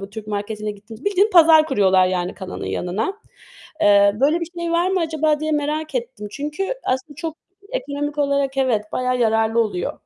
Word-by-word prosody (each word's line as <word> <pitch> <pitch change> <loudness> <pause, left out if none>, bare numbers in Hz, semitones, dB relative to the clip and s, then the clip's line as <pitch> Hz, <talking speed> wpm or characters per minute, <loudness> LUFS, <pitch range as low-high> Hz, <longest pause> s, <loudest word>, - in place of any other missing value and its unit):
bu 195 0 -8
Türk 215 0 -8
marketine 210 +1 -4
gittiğimizde. 215 +4 -12
Bildiğin 405 +3 +3
pazar 320 -4 +7
kuruyorlar 190 -8 +3
yani 180 0 -2
kanalın 190 -1 -7
yanına. 205 - -2 0.7
Eee, 200 -3 +5
"Böyle 305 +5 +3
bir 335 - -3
şey 335 0 -2
var 345 +2 +2
mı 380 - +1
acaba?" 310 -2 0
diye 310 0 -1
merak 300 +1 -2
ettim. 235 -4 -4
Çünkü 300 - -3
aslında 260 +4 -2
çok 320 +1 -5 0.4
ekonomik 290 -9 -3
olarak 280 -1 0
evet 245 -6 +1
bayağı 255 0 0
yararlı 225 0 +2
oluyor. 205 -6 -2
265 Hz, 175 wpm, -21 LUFS, 210-310 Hz, 0.7 s, pazar